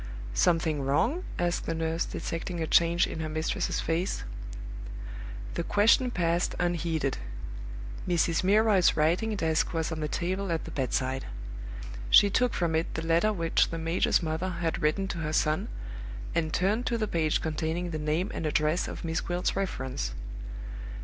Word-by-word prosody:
"Something 160 - +2
wrong?" 235 - +1
asked 175 0 0
the 165 - 0
nurse, 165 +1 0
detecting 170 +1 -4
a 160 - 0
change 170 +2 +4
in - - -5
her 160 -1 -2
mistress's 155 +1 -1
face. 165 - -1 1.3
The - - -1
question 220 +5 +4
passed 175 -4 +1
unheeded. 165 -5 0 0.9
Mrs. 170 -1 +2
Milroy's 200 -2 +4
writing 175 +8 +2
desk 160 -2 +1
was 160 0 0
on 160 - -3
the 150 - -1
table 185 +4 -1
at 165 - 0
the - - -7
bedside. 130 0 -1 0.8
She 200 - +8
took 250 +3 +2
from 170 -2 +1
it 160 +1 0
the 160 - -2
letter 170 +6 +3
which 170 -5 +2
the 165 - -3
major's 165 +2 +2
mother 160 +3 -1
had 170 -2 -2
written 155 +6 +1
to 170 - -3
her 155 -1 -2
son, 155 0 +2 0.7
and 160 -2 0
turned 210 +9 +1
to 235 - +1
the 215 -1 0
page 160 -5 +1
containing 160 +2 -2
the 155 - -2
name 155 +5 0
and 160 - -2
address 155 +3 +2
of - - -6
Miss 160 0 0
Gwilt's 175 +1 -1
reference. 130 - -2
165 Hz, 160 wpm, -29 LUFS, 155-180 Hz, 1.3 s, She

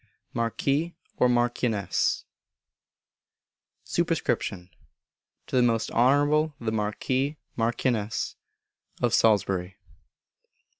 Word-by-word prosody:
Marquis 140 +8 0 0.2
or 125 - +4
Marchioness. 120 -3 +1 1.6
Sup. - - 0
To 90 -1 -1 0.8
the 130 - +3
Most 115 -2 +1
Honourable 145 +5 +3
the 115 -2 -2
Marquis 130 +7 -1 0.2
(Marchioness) 115 -2 -1 0.6
of - - +1
Salisbury. 95 -3 +2
120 Hz, 70 wpm, -27 LUFS, 110-135 Hz, 1.6 s, or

